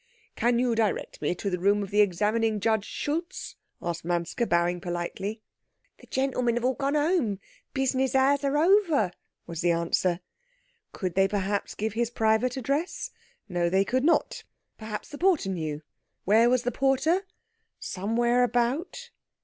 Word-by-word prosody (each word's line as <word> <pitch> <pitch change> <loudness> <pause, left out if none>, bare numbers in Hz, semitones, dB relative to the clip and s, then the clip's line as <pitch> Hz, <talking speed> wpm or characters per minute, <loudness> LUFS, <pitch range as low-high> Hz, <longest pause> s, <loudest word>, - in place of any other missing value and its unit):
"Can 240 0 +2
you 245 -1 +2
direct 220 -3 -1
me - - 0
to 200 - -5
the 180 - -1
room 200 +3 +2
of 195 - -8
the 210 +1 +5
Examining 210 +3 +1
Judge 220 0 +1
Schultz?" 335 +5 -4 0.3
asked 170 -1 -3
Manske, 175 +7 -1
bowing 175 +1 +1
politely. 190 +5 -4 0.6
"The - - -16
gentlemen 255 -3 0
have 240 0 -1
all 260 - +3
gone 280 +2 -1
home. 295 - +1 0.4
Business 265 0 +1
hours 275 +2 +3
are 280 +1 +1
over," 330 - +3 0.3
was 165 -1 -5
the 175 - +2
answer. 170 +1 +1 0.7
Could 185 -4 -3
they 195 +1 +4
perhaps 200 0 -2
give 215 0 -2
his 235 +1 0
private 225 +2 +1
address? 280 +7 -2 0.4
No, 175 -3 0
they 190 +2 +2
could 255 +5 0
not; 335 +3 +1 0.3
perhaps 215 -1 -6
the 290 - -9
porter 350 - +2
knew. 155 -4 -3 0.4
Where 225 +4 +5
was 250 0 +2
the 245 - 0
porter? 310 +9 +1 0.5
Somewhere 235 +5 +1
about. 270 - -1
225 Hz, 155 wpm, -27 LUFS, 190-270 Hz, 0.7 s, the